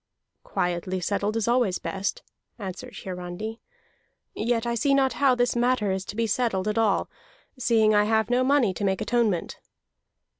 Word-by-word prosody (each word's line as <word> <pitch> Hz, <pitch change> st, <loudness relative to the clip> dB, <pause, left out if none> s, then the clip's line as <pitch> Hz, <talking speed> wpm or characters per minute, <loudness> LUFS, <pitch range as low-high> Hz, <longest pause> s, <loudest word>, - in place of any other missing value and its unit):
"Quietly 185 Hz, -, -2 dB
settled 205 Hz, +4 st, -1 dB
is 225 Hz, -, -1 dB
always 235 Hz, -6 st, +2 dB
best," 195 Hz, +1 st, -3 dB, 0.3 s
answered 195 Hz, -4 st, -7 dB
Hiarandi. 185 Hz, +5 st, -6 dB, 0.7 s
"Yet 230 Hz, +1 st, 0 dB
I 235 Hz, -, 0 dB
see 275 Hz, +4 st, +2 dB
not 265 Hz, -1 st, +2 dB
how 275 Hz, -3 st, +3 dB
this 245 Hz, 0 st, +1 dB
matter 240 Hz, -4 st, +1 dB
is 190 Hz, 0 st, -2 dB
to 205 Hz, -, -7 dB
be 230 Hz, +1 st, +1 dB
settled 215 Hz, -3 st, 0 dB
at 210 Hz, +1 st, 0 dB
all, 215 Hz, -3 st, +2 dB, 0.5 s
seeing 220 Hz, -3 st, +3 dB
I 210 Hz, 0 st, +4 dB
have 220 Hz, 0 st, +2 dB
no 245 Hz, +2 st, +2 dB
money 260 Hz, -7 st, +3 dB
to 205 Hz, -, -5 dB
make 190 Hz, -1 st, +1 dB
atonement." 225 Hz, -8 st, 0 dB
220 Hz, 160 wpm, -26 LUFS, 195-240 Hz, 0.7 s, I